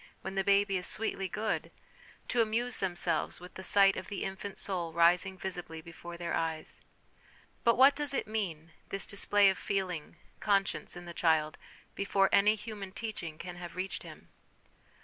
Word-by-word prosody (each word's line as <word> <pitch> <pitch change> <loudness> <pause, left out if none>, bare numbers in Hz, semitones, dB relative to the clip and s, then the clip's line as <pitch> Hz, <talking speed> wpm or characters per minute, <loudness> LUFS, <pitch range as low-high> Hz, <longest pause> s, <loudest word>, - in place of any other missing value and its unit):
when - - -5
the 195 0 0
baby 200 0 +3
is 180 - -2
sweetly 195 -2 -1
good, 220 +3 -2 0.6
to 240 - +2
amuse 230 +2 +1
themselves 175 -4 0
with 180 +1 -11
the - - -8
sight 195 0 +5
of 185 - -5
the 205 - -4
infant 195 +1 -5
soul 175 -4 -2
rising 175 +3 +3
visibly 175 -4 -5
before 170 +1 -9
their 170 -1 -3
eyes. 160 -1 -2 0.8
But 235 -1 +4
what 270 +2 +7
does 295 -3 -1
it 275 - -1
mean, 175 -7 -3 0.2
this 195 - +1
display 200 0 +4
of 190 - -6
feeling, 185 -5 -2 0.2
conscience, 195 -3 0
in 175 - -9
the 170 - -7
child, 160 -2 +2 0.4
before 200 -1 +2
any 210 +2 +5
human 210 -3 -7
teaching 195 -8 -5
can 175 +1 -7
have 175 -1 -8
reached 185 +1 -3
him - - -12
190 Hz, 170 wpm, -31 LUFS, 175-205 Hz, 0.8 s, what